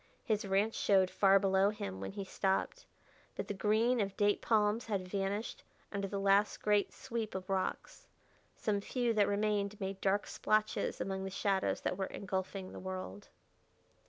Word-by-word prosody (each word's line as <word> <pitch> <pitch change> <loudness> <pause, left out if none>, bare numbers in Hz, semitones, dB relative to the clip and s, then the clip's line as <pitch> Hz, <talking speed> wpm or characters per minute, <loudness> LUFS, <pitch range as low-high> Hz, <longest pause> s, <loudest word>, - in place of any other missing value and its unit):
His 210 -3 0
ranch 200 +3 +2
showed 190 -2 +3
far 195 -1 +5
below 195 0 +3
him 95 - -5
when 95 0 -5
he 200 - -4
stopped, 190 0 -1 0.5
but - - -4
the - - -2
green 220 +5 +2
of 195 -1 -3
date 205 0 +2
palms 215 +1 +2
had 195 -4 -2
vanished 200 +3 -3 0.3
under 200 -1 -2
the 200 0 -3
last 200 +1 +3
great 210 -1 +2
sweep 230 -5 -5
of 190 0 -5
rocks. 190 -1 -3 0.5
Some 205 -2 -1
few 240 +2 0
that 210 -2 +3
remained 205 0 0
made 195 -1 -4
dark 200 +1 +2
splotches 215 0 0
among 190 0 -2
the 190 - -3
shadows 195 0 0
that 180 - -1
were 190 - 0
engulfing 190 0 -4
the - - -8
world. 185 - -6
200 Hz, 165 wpm, -34 LUFS, 190-210 Hz, 0.5 s, far